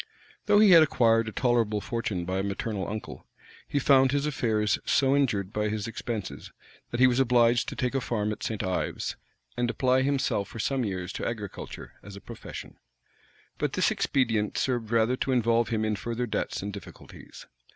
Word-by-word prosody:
Though 205 0 +5
he 210 -2 +7
had 165 -2 +9
acquired 115 -6 +3
a - - -8
tolerable 115 -3 +1
fortune 105 -5 -3
by 95 +2 -2
a - - -1
maternal 100 0 -3
uncle, 110 +1 -7 0.4
he - - -2
found 135 -1 +5
his 145 +1 0
affairs 110 -7 0
so 135 0 +3
injured 105 -9 0
by 105 0 0
his 105 0 -3
expenses, 115 -3 -5 0.4
that 120 - -4
he 130 - +7
was 125 0 +3
obliged 120 -1 +3
to - - -7
take 125 0 -1
a 135 - 0
farm 110 -2 -1
at 105 - -6
St. 110 -2 -3
Ives, 95 -1 -2 0.4
and 120 0 0
apply 130 +1 +2
himself 135 -7 0
for - - -10
some 130 +3 0
years 95 -4 -4
to - - -3
agriculture 105 -4 -7
as 100 -1 -11
a - - -9
profession. - - -10 0.8
But - - -1
this - - +2
expedient 115 -6 0
served 120 -4 -1
rather 115 +2 +2
to 135 - -1
involve 115 -2 +2
him 110 -1 0
in 110 -1 0
further 120 +4 -3
debts 110 - -3
and 100 0 -5
difficulties. 100 -3 -12
115 Hz, 185 wpm, -27 LUFS, 105-130 Hz, 0.8 s, had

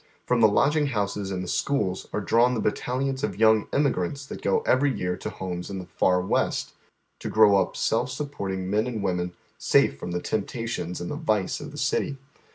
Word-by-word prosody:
From 125 -2 +2
the 110 - +8
lodging 150 +8 +3
houses 100 -5 -2
and 95 -1 -3
the - - -6
schools 100 -5 -1
are 105 - -2
di 100 - -2
awn 125 +2 +5
the - - -1
battalions 130 +5 -1
of 100 -8 -2
young 110 -1 +4
emigrants 140 -2 0
that - - -8
go 95 - +2
every 140 +2 +3
year 90 -6 -2
to - - -5
homes 90 -1 -5
in 100 - -4
the 90 - -6
Far 90 +1 +2
West, 90 - 0 0.5
to - - -4
grow 105 -2 +6
up 95 -2 0
self 115 - +1
supporting 100 -9 -4
men 105 +4 +1
and 110 -5 -3
women 90 -2 -1 0.3
safe 70 - +3
from - - -5
the 90 0 -1
temptations 110 -4 -3
and 90 - -4
the - - -3
vice 110 - 0
of - - -7
the - - -10
city. 140 - 0
105 Hz, 205 wpm, -26 LUFS, 95-125 Hz, 0.5 s, the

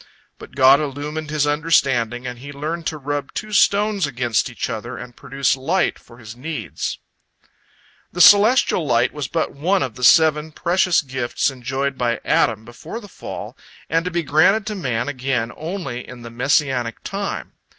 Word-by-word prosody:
But - - -13
God 135 0 +6
illumined 150 +2 -4
his 150 -1 +1
understanding, 135 -6 +1
and 125 -1 -6
he 140 +3 -9
learned 155 +4 -4
to 155 - -3
rub 145 -1 -4
two 215 0 -5
stones 200 -3 +3
against 120 -5 0
each - - -4
other - - -5
and 125 -1 -10
produce 135 0 0
light 160 +9 0
for 120 - -17
his 110 -2 -10
needs. 150 +5 -5 1.1
The 175 - -7
celestial 205 - +6
light 120 -5 +1
was 145 -3 -4
but 165 +3 -1
one 175 +5 +1
of 130 -3 -4
the 125 +2 -9
seven 155 +2 +5
precious 175 0 +2
gifts 130 0 -1
enjoyed 130 +2 -3
by 120 -1 0
Adam 110 -1 +1
before 120 - -8
the 210 - -12
fall - - -8 0.4
and 165 +1 +2
to 180 - -2
be 170 -1 -1
granted 180 +9 +3
to 215 - -3
man 125 - -2
again 130 -4 -2
only 155 -8 -5
in 125 -2 -11
the 115 - -9
Messianic 125 -1 0
time. 200 0 -4
145 Hz, 170 wpm, -21 LUFS, 125-165 Hz, 1.1 s, God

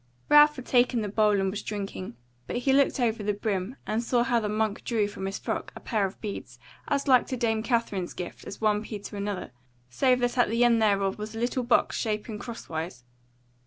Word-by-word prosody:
Ralph 295 0 +7
had 255 - -8
taken 245 -2 +3
the 205 - -3
bowl 210 0 +3
and 195 0 0
was 205 - -4
drinking, 195 - -5 0.3
but - - -4
he 255 +2 +2
looked 275 0 +3
over 225 -3 +1
the 205 0 -1
brim, 205 +2 -2
and 220 +2 0
saw 240 0 +2
how 240 -1 +2
the 210 -2 -2
monk 215 0 -1
drew 220 -4 +1
from 200 -2 -6
his 195 - -3
frock - - -4
a - - -8
pair 210 -5 0
of 190 - -12
beads, 200 - -6 0.3
as 285 0 0
like 255 -3 +5
to 255 - -3
Dame 225 -2 +1
Katherine's 225 -6 -1
gift 180 - -7
as - - -7
one 210 -1 +2
pea 215 - -5
to 205 +1 -9
another, 200 -6 -4 0.4
save 255 - +3
that 245 +1 0
at 245 - +4
the 230 +2 +2
end 235 -2 +4
thereof 200 -2 +2
was 215 +1 -6
a - - -4
little 245 +2 0
box 240 0 +2
shapen 215 0 -3
crosswise. 165 - -6
220 Hz, 220 wpm, -27 LUFS, 205-240 Hz, 0.4 s, Ralph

